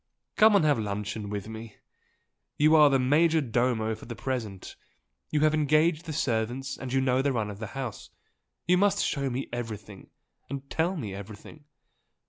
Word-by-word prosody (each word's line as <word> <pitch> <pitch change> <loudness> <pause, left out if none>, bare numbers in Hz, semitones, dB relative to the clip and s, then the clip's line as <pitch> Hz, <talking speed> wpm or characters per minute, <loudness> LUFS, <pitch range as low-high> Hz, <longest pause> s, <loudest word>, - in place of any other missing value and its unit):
"Come 215 -1 +6
and 195 - +4
have 145 -5 +3
luncheon 105 0 -4
with 105 0 -4
me! 110 0 -9 0.8
You 155 +2 +5
are 150 -2 +7
the 135 - +3
major 155 +5 +3
domo 120 -4 0
for 110 - -10
the 120 - -6
present 110 -6 -5 0.5
you 150 - 0
have 155 0 +4
engaged 155 +2 +2
the 160 - -5
servants 125 0 -1
and 130 -2 -7
you 135 - +2
know 130 0 +2
the 140 +1 +1
run 110 -4 -2
of 100 - -10
the 110 - -5
house 125 -6 -5 0.6
you 180 +2 +3
must 205 0 +2
show 140 -2 -1
me 130 +2 -3
everything 105 -4 -7 0.4
and 140 0 -6
tell 175 +3 0
me 110 -10 -5
everything! 105 +9 -10
130 Hz, 175 wpm, -27 LUFS, 110-150 Hz, 0.8 s, are